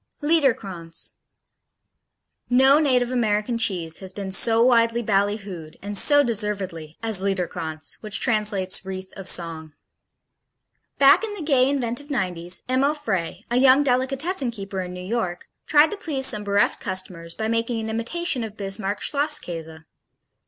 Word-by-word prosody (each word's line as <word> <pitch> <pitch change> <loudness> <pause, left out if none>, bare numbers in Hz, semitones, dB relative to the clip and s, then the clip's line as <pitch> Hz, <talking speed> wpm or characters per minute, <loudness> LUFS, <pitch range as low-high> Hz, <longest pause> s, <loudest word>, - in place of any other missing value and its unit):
Liederkranz 205 - 0 1.4
No 265 +4 +5
native 250 -5 +2
American 230 -1 0
cheese 180 -8 -1
has 190 -1 -8
been 195 0 -6
so 225 +4 +4
widely 235 -1 +3
ballyhooed, 200 -5 -2
and 205 +1 -6
so 290 +8 +5
deservedly, 200 - -3
as 220 -4 +2
Liederkranz, 175 -5 -3
which 215 -1 -1
translates 210 -6 +1
"Wreath 190 0 -7
of 195 -2 -4
Song." 160 -3 -1 1.2
Back 275 +9 +6
in 425 -2 -4
the 365 - -6
gay, 270 -4 +3
inventive 275 +1 -3
nineties, 180 -9 -1
Emil 270 +4 +1
Frey, 205 - -3
a 240 - +2
young 265 +2 +6
delicatessen 270 +3 0
keeper 195 -4 -5
in 180 -1 -6
New 180 0 -8
York, 185 -5 -3 0.2
tried 300 +1 +5
to 420 - -4
please 285 -8 0
some 210 -4 +4
bereft 200 0 +1
customers 185 -3 -3
by 220 - -3
making 230 +1 -1
an 220 0 -4
imitation 245 +4 -1
of 215 -1 -8
Bismarck 195 0 -3
Schlosskäse. 175 - -2
215 Hz, 140 wpm, -23 LUFS, 185-255 Hz, 1.4 s, Back